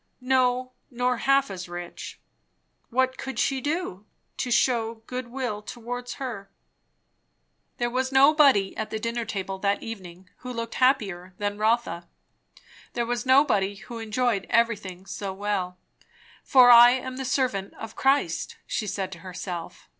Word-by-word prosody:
No, 255 -1 +2 0.2
nor 250 0 0
half 275 -2 +2
as 185 -2 -7
rich. 175 0 -8 0.7
What 260 +1 +1
could 265 -3 -5
she 270 +2 +1
do, 290 - -3 0.3
to 250 - -2
shew 230 -2 +1
good 250 0 -5
will 240 -4 -4
towards 245 +2 -6
her? 230 -8 -6 1.3
There 240 - 0
was 260 +1 -1
nobody 275 -7 +5
at 220 - -4
the 220 - -3
dinner 230 +1 -3
table 195 -2 -4
that 200 +1 0
evening, 185 -5 -9
who 250 - -7
looked 230 -1 -4
happier 195 -9 +1
than 205 0 -3
Rotha; 215 -6 0 0.9
there 235 - -1
was 240 +1 -3
nobody 255 -8 +4
who 215 +4 -9
enjoyed 225 -2 -1
everything 200 -6 0
so 195 -1 -5
well. 190 -2 -2 0.7
For 250 -2 +7
I 240 0 +10
am 260 0 -4
the 265 - -3
servant 250 -7 -1
of 225 0 -9
Christ 275 +2 +1
she 215 - -3
said 190 -1 -3
to 175 - -9
herself. 180 -1 -7
230 Hz, 145 wpm, -26 LUFS, 195-255 Hz, 1.3 s, I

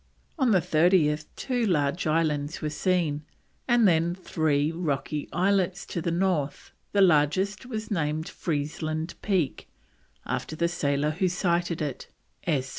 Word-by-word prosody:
On 260 -3 +3
the 190 -5 +4
30th 155 -2 +3
two 250 -3 -1
large 160 -4 +1
islands 155 -1 0
were 155 -2 -3
seen, 160 -2 0 0.5
and 240 -3 +5
then 170 0 +2
three 155 -5 0
rocky 150 -3 -2
islets 190 0 +1
to 170 - -4
the 170 - -1
north; 170 -5 -1 0.2
the 200 - +3
largest 185 - +2
was 220 -3 -5
named 155 -3 -1
Freezeland 155 +1 -3
Peak, 185 -9 -1 0.6
after 155 - -3
the 170 +2 +1
sailor 150 -3 0
who 185 +4 0
sighted 175 -2 0
it, 140 -4 -5 0.4
S. 140 -6 0
165 Hz, 135 wpm, -27 LUFS, 150-185 Hz, 0.6 s, and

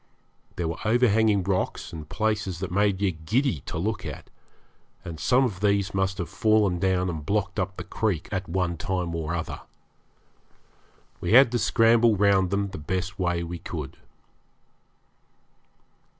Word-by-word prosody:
There 85 - -2
were 80 - -4
overhanging 110 -3 +3
rocks 95 -2 -2
and 75 -2 -8
places 105 -4 -1
that 95 0 -5
made 100 0 +2
you 95 - +3
giddy 90 - 0
to - - -4
look 105 +6 -2
at, - - -8 0.7
and 80 -3 -7
some 125 - +3
of 105 -8 -2
these 100 -1 +1
must 95 0 0
have 85 - -3
fallen 105 -1 +2
down 95 0 +1
and 80 -4 -4
blocked 100 +4 -1
up 95 0 -2
the 90 - -5
creek 100 -4 -2
at 95 -3 -3
one 85 -1 -1
time 90 -1 -2
or 80 0 -2
other. 80 - -5 1.6
We 90 - -1
had 130 -1 +8
to 120 - 0
scramble 115 +1 +4
round 100 -2 +3
them 100 +1 -1
the 95 - -7
best 95 +4 -3
way 85 -1 0
we 85 0 -6
could. 80 -5 -6
95 Hz, 155 wpm, -26 LUFS, 85-105 Hz, 1.6 s, had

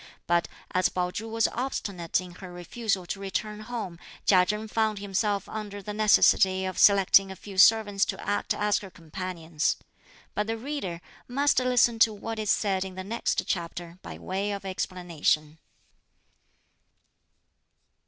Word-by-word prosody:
But 170 0 +2 0.2
as 185 0 +2
Pao 180 -1 -1
Chu 225 +4 -5
was 225 0 +2
obstinate 200 -10 -2
in 180 -1 -10
her 180 +1 -10
refusal 190 +2 -2
to 195 - -5
return 210 +2 -3
home, 215 -6 -6 0.3
Chia 180 -2 +5
Chen 210 +2 -2
found 220 -1 0
himself 200 0 -1
under 210 -2 -6
the 210 +1 -6
necessity 195 -2 +4
of 185 -1 -4
selecting 195 -1 +6
a - - -7
few 195 0 -7
servants 205 -1 +5
to - - -4
act 205 - -1
as 210 0 +1
her 195 - -10
companions. 165 -2 -3 0.6
But 210 0 -1
the 225 0 -2
reader 225 - -4 0.3
must 280 +3 +2
listen 245 -2 +3
to 220 -1 +5
what 225 +2 -5
is 215 -1 -2
said 195 -3 +1
in 190 -1 -8
the 185 - -5
next 225 +5 -1
chapter 170 0 -4
by - - -8
way 195 +2 -3
of 200 -1 -6
explanation. 170 -5 -1
195 Hz, 155 wpm, -27 LUFS, 180-215 Hz, 0.6 s, selecting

